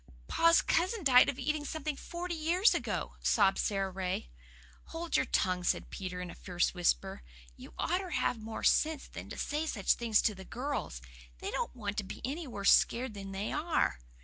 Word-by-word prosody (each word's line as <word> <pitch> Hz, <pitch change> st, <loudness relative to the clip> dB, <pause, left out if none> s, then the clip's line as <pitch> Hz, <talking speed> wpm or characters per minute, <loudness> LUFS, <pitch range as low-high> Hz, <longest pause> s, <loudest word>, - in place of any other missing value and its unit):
"Pa's 335 Hz, 0 st, +4 dB
cousin 370 Hz, +5 st, +1 dB
died 255 Hz, -3 st, +7 dB
of 275 Hz, -, -3 dB
eating 300 Hz, +2 st, -1 dB
something 305 Hz, 0 st, -3 dB
forty 345 Hz, +4 st, -5 dB
years 340 Hz, +6 st, +3 dB
ago," -, -, -3 dB
sobbed 195 Hz, -3 st, +3 dB
Sara 195 Hz, -2 st, 0 dB
Ray. 185 Hz, -, -3 dB, 0.5 s
"Hold 330 Hz, +1 st, -4 dB
your 260 Hz, -, +2 dB
tongue," 180 Hz, -4 st, +1 dB
said -, -, 0 dB
Peter 180 Hz, -2 st, -5 dB
in 180 Hz, -1 st, -6 dB
a -, -, -9 dB
fierce 180 Hz, -1 st, -1 dB
whisper. 175 Hz, -, 0 dB, 0.3 s
"You -, -, -13 dB
oughter 365 Hz, +2 st, -1 dB
have 245 Hz, -, 0 dB
more 220 Hz, 0 st, -6 dB
sense 310 Hz, -2 st, +3 dB
than -, -, -9 dB
to -, -, -7 dB
say 300 Hz, +2 st, -2 dB
such 200 Hz, -10 st, +2 dB
things 230 Hz, -3 st, +2 dB
to 215 Hz, -, +2 dB
the 190 Hz, -1 st, -10 dB
girls. 245 Hz, -, -4 dB, 0.3 s
They -, -, -5 dB
don't -, -, -3 dB
want 205 Hz, -4 st, -4 dB
to 210 Hz, -, 0 dB
be 190 Hz, -, -8 dB
any 295 Hz, +5 st, -4 dB
worse 200 Hz, -5 st, +2 dB
scared 245 Hz, -1 st, +3 dB
than 195 Hz, -1 st, -7 dB
they 195 Hz, +2 st, -3 dB
are." 300 Hz, -, 0 dB
245 Hz, 190 wpm, -32 LUFS, 195-315 Hz, 0.5 s, died